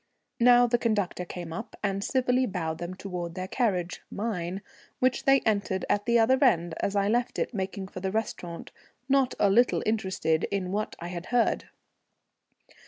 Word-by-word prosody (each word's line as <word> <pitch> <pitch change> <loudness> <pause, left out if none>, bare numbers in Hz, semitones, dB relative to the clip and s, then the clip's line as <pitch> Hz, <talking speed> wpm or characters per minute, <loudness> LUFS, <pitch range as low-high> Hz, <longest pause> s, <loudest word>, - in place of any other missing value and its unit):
Now 245 0 +7
the 240 0 +1
conductor 205 -6 0
came 175 -2 -7
up 225 +7 -7
and 200 -1 -1
civilly 255 +1 +1
bowed 165 -4 -3
them 175 +1 -5
towards 180 -3 -5
their 185 0 -4
carriage, 185 -7 -1
mine, 195 -3 -3 0.3
which 255 0 +1
they 270 0 +5
entered 200 -3 0
at 205 +1 0
the 235 0 +4
other 260 +5 +4
end 175 -9 +3
as 200 - -1
I 200 0 +2
left 240 +3 0
it - - -1
making 190 -1 -3
for 185 - -8
the 190 +1 -2
restaurant, 180 -5 -4 0.4
not 270 -2 +2
a - - +5
little 240 +4 +3
interested 190 -7 0
in 190 -2 -2
what 210 +2 -2
I 170 - -6
had 175 0 -6
heard. 245 -1 +1
200 Hz, 170 wpm, -28 LUFS, 180-235 Hz, 0.4 s, Now